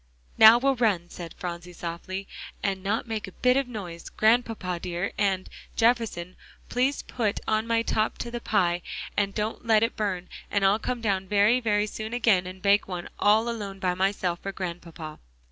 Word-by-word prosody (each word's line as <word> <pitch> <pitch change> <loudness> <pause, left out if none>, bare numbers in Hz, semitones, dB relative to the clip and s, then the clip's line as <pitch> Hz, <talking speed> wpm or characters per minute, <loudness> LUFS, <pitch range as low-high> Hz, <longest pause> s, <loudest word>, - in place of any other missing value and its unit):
"Now 220 +1 +9
we'll 270 +1 +1
run," 195 -7 +1
said 170 -2 -8
Phronsie 175 0 -6
softly, 180 +3 -5 0.4
"and 195 -1 -1
not 215 +5 -1
make 220 -2 -3
a 190 - -11
bit 250 0 +3
of 275 -1 +1
noise, 185 -8 -7
Grandpapa 220 -5 +1
dear, 180 +2 -3
and, 195 -3 0 0.3
Jefferson, 225 -7 +1 0.3
please 260 +3 +1
put 220 -5 -1
on 220 +1 +1
my 230 0 +2
top 215 -1 0
to 235 - -5
the 240 0 -4
pie, 175 -6 +1 0.3
and 200 -1 0
don't 215 +1 -2
let 220 -1 +5
it 230 - 0
burn, 190 -4 -2 0.2
and 200 -1 +1
I'll 200 +3 +4
come 245 +1 -3
down 195 -3 0
very, 210 +5 +4
very 210 -3 +1
soon 220 +1 -6
again, 205 -7 +3
and 185 0 -9
bake 200 +1 +4
one 180 -2 -5
all 215 +3 +4
alone 205 -4 -4
by 185 -2 0
myself 185 -2 0
for 195 - -5
Grandpapa." 170 -4 -7
205 Hz, 180 wpm, -26 LUFS, 185-225 Hz, 0.4 s, Now